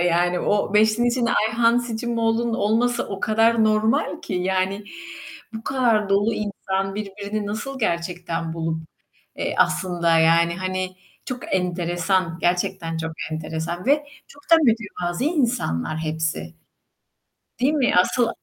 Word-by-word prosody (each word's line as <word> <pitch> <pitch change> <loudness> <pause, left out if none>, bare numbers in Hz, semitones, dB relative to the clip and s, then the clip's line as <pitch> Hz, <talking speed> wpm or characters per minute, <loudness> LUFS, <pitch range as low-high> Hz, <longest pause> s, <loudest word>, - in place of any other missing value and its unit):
yani, 175 0 +2
o 205 0 0
5'linin 220 +3 +4
içinde 235 -1 0
Ayhan 230 +2 +3
Sicimoğlu'nun 235 -1 -1
olması 230 +4 +1
o 195 -1 -5
kadar 225 +1 +3
normal 215 +1 +1
ki, 195 - -5
yani, 190 +2 -1 0.7
bu 220 0 -7
kadar 235 -6 +2
dolu 205 +3 +2
insan 195 -2 -3
birbirini 205 0 -4
nasıl 250 +6 -4
gerçekten 170 -4 -2
bulup 160 -1 -2 0.6
eee, - - -2
aslında, 170 -3 +2
yani, 170 +1 +4
hani, 185 0 -3 0.3
çok 250 -5 -4
enteresan, 175 -1 0
gerçekten 175 -1 0
çok 160 0 -3 0.2
enteresan 160 +3 -4
ve 290 +2 +3 0.2
çok 285 0 -17
da 330 - +9
mütevazi 215 - 0
insanlar 240 - 0
hepsi, 160 - -3 1.1
değil 265 +4 +3
mi? 285 -5 +2
Asıl 230 +6 +3
195 Hz, 125 wpm, -23 LUFS, 175-230 Hz, 1.1 s, da